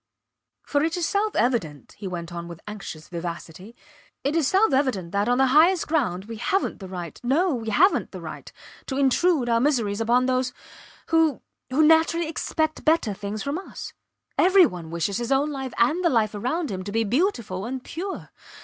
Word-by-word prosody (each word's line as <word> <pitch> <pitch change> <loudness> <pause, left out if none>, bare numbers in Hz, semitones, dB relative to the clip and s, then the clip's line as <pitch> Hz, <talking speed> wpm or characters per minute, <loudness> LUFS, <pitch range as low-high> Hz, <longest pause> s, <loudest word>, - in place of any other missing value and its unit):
For 285 - 0
it 325 +3 0
is 345 - 0
self 420 +1 0
evident, 185 - -1
he 205 - -8
went 175 -2 -6
on 170 0 -6
with 170 -1 -9
anxious 195 -7 -8
vivacity, 170 +4 -7 0.5
it 280 +3 0
is 320 -5 +2
self 385 -2 +3
evident 250 -11 0
that, 200 +3 0
on 245 - +3
the 265 - +4
highest 335 +4 +5
ground 220 - 0
we 225 +1 -7
havent 250 - -1
the 190 - -8
right 175 -3 -7
no, 310 +8 +2
we 225 -3 -3
havent 360 - +3
the - - -7
right - - -8 0.4
to 265 - -3
intrude 280 +1 +2
our 230 -1 +3
miseries 230 -6 +1
upon 240 +3 +3
those 255 0 0 0.6
who 325 -4 +2 0.3
who 295 +4 +3
naturally 325 +1 +4
expect 315 0 -2
better 315 -9 +2
things 205 +2 -5
from 285 +5 -2
us. 385 - -9 0.5
Every 375 0 +7
one 175 - -5
wishes 170 +4 -1
his 240 +2 -3
own 280 +3 +2
life 265 -2 -4
and 305 +10 +2
the 340 - +4
life 220 -5 +1
around 255 +9 -2
him 185 -1 -4
to 205 - -5
be 225 +2 +1
beautiful 230 - -1
and 255 +1 -5
pure. 375 +4 -6
250 Hz, 190 wpm, -24 LUFS, 200-315 Hz, 0.6 s, Every